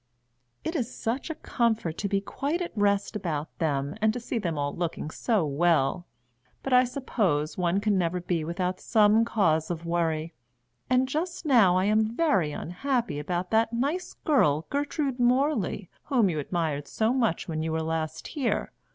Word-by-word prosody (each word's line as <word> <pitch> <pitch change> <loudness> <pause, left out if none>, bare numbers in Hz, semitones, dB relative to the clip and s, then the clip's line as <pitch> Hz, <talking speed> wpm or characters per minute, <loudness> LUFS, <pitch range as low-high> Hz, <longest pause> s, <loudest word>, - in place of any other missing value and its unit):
"It 325 - -3
is 255 -5 -1
such 245 +8 -3
a 320 - -3
comfort 225 - 0
to 200 - -1
be 200 0 +1
quite 285 - -2
at 350 -7 -5
rest 200 0 +1
about 160 -7 -3
them, 140 -3 0
and 220 0 +4
to 245 - -4
see 235 0 -3
them 170 -7 -2
all 145 0 -2
looking 170 -2 -3
so 215 -5 +1
well. 160 +2 +1 0.6
But 270 - -1
I 250 0 +6
suppose 200 - -1
one 180 +1 +1
can 205 -2 +1
never 175 +1 0
be 175 -2 -1
without 180 +3 -2
some 215 0 +4
cause 160 -9 +1
of 170 -1 -4
worry, 165 -1 -1 0.6
and 255 +1 +3
just 335 +5 -3
now 220 -11 +5
I 185 - +2
am 215 +2 +2
very 195 - +2
unhappy 230 - -2
about 175 +4 -3
that 225 +1 +2
nice 290 +10 -2
girl 160 - +3
Gertrude 285 -2 -1
Morley 245 - +1 0.2
whom 235 -10 +3
you 155 - -2
admired 150 -2 -2
so 220 +2 +1
much 230 -10 0
when 160 -2 -2
you 160 0 -2
were 160 0 -1
last 160 0 -3
here. 275 -7 -1
200 Hz, 175 wpm, -27 LUFS, 165-245 Hz, 0.6 s, I